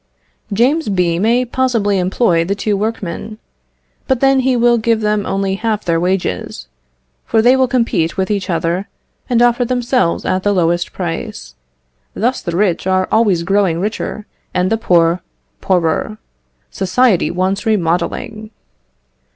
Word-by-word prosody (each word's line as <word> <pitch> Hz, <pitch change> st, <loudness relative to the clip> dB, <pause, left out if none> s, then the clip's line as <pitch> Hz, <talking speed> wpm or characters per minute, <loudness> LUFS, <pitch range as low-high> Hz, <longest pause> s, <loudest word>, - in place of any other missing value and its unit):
James 255 Hz, +8 st, +1 dB
B. 175 Hz, -3 st, +1 dB
may 235 Hz, +5 st, +2 dB
possibly 230 Hz, -6 st, 0 dB
employ 180 Hz, -2 st, +1 dB
the 195 Hz, +4 st, -2 dB
two 205 Hz, +1 st, -1 dB
workmen, 215 Hz, 0 st, -4 dB, 0.7 s
but 265 Hz, -3 st, +1 dB
then 270 Hz, 0 st, +4 dB
he 260 Hz, 0 st, +1 dB
will 240 Hz, 0 st, +3 dB
give 225 Hz, 0 st, +1 dB
them 210 Hz, -1 st, 0 dB
only 195 Hz, 0 st, -1 dB
half 215 Hz, +1 st, -2 dB
their 165 Hz, -2 st, +1 dB
wages, 175 Hz, -, -2 dB, 0.6 s
for 225 Hz, -, +1 dB
they 245 Hz, +4 st, +5 dB
will 260 Hz, -1 st, +2 dB
compete 230 Hz, -10 st, 0 dB
with 190 Hz, +2 st, -1 dB
each 200 Hz, -2 st, -2 dB
other, 170 Hz, +3 st, -1 dB, 0.4 s
and 240 Hz, -1 st, +3 dB
offer 240 Hz, +1 st, +3 dB
themselves 245 Hz, -5 st, 0 dB
at 185 Hz, -, 0 dB
the 205 Hz, +1 st, +1 dB
lowest 175 Hz, -1 st, +1 dB
price. 165 Hz, -, -5 dB, 0.6 s
Thus 245 Hz, +4 st, 0 dB
the 170 Hz, -1 st, -3 dB
rich 190 Hz, -3 st, 0 dB
are 185 Hz, 0 st, +1 dB
always 205 Hz, -6 st, +2 dB
growing 195 Hz, -2 st, +1 dB
richer, 210 Hz, +1 st, -4 dB, 0.3 s
and 180 Hz, +2 st, +1 dB
the 225 Hz, -, +2 dB
poor, 170 Hz, -4 st, +2 dB, 0.4 s
poorer. 180 Hz, +3 st, 0 dB, 0.5 s
Society 195 Hz, +2 st, +2 dB
wants 190 Hz, +5 st, -1 dB
remodelling." 210 Hz, +3 st, -1 dB
200 Hz, 145 wpm, -16 LUFS, 180-230 Hz, 0.7 s, they